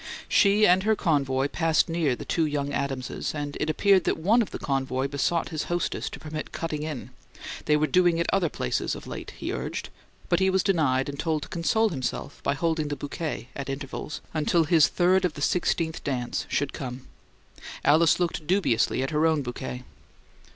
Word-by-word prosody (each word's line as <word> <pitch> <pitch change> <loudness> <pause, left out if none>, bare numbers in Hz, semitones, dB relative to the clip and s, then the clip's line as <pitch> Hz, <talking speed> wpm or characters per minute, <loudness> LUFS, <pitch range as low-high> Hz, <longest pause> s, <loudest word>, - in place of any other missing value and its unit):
She 205 +1 +5
and 180 0 +5
her 220 +2 +2
convoy 140 -6 +1
passed 165 -1 +2
near 165 -6 +1
the - - -8
two 165 -2 +1
young 145 -1 -2
Adamses; 135 +1 -3
and 145 -1 -4
it 150 - -1
appeared 190 +3 +4
that - - +1
one 205 +9 +3
of 220 - -2
the - - -5
convoy 135 -1 -1
besought 145 +4 0
his 155 -3 -3
hostess 175 0 -2
to - - -9
permit 155 0 -6
"cutting 155 -3 -3
in"; 150 -5 -5 0.5
they 150 0 +4
were 155 - +2
"doing 175 0 +3
it 170 - +1
other 185 -4 +2
places" - - -2
of - - -9
late, - - -7
he - - -3
urged; - - -4 0.4
but 175 - +2
he 190 0 +3
was 190 -1 +2
denied 150 -9 +2
and 140 0 -6
told 155 -3 0
to - - -9
console 220 +6 +1
himself 135 -1 -4
by 140 - 0
holding 160 +1 0
the 145 - -2
bouquet, 145 -3 -5
at 140 -1 -5
intervals, 140 +2 -5
until 165 +2 +2
his 160 -1 +5
third 185 +1 +3
of 175 -4 0
the - - -7
sixteenth 165 -1 0
dance 125 -4 -2
should 145 -1 -1
come. 130 -1 -6 0.8
Alice 155 +4 +5
looked 170 -3 -2
dubiously 170 - +2
at 135 - -3
her 155 +1 +3
own 155 -3 +1
bouquet. 125 0 -5
155 Hz, 195 wpm, -26 LUFS, 140-175 Hz, 0.8 s, She